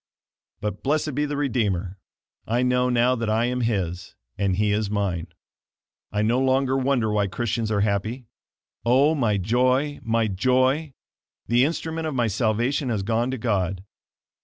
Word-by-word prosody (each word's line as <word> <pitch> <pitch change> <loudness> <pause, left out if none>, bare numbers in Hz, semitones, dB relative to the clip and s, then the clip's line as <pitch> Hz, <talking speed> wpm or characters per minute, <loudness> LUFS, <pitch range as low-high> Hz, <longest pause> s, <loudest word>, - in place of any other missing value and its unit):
But 105 -1 -3
blessed 150 +1 0
be 145 +3 0
the 145 -1 -3
Redeemer, 100 -9 -1 0.5
I 120 +3 +1
know 125 0 +2
now 120 +1 +3
that 115 -3 -2
I 110 +2 +2
am 125 +1 -1
His, 95 -5 -2 0.2
and 100 -2 0
He 105 +1 +1
is 105 0 0
mine. 100 -5 -1 0.8
I 105 0 0
no 115 +4 +2
longer 130 0 +2
wonder 130 -5 +1
why 105 -1 +1
Christians 115 +3 -2
are 105 -2 +1
happy. 105 +5 -1 0.6
Oh, 135 +6 +4
my 115 -9 +1
joy, 130 +8 +1
my 115 0 +1
joy! 130 - +1 0.5
The 120 +2 +3
instrument 160 +1 -3
of 150 - -3
my 120 -2 +2
salvation 120 +5 0
has 105 -4 -1
gone 115 +4 0
to 130 - -2
God. 95 -5 -1
120 Hz, 160 wpm, -24 LUFS, 105-130 Hz, 0.8 s, Oh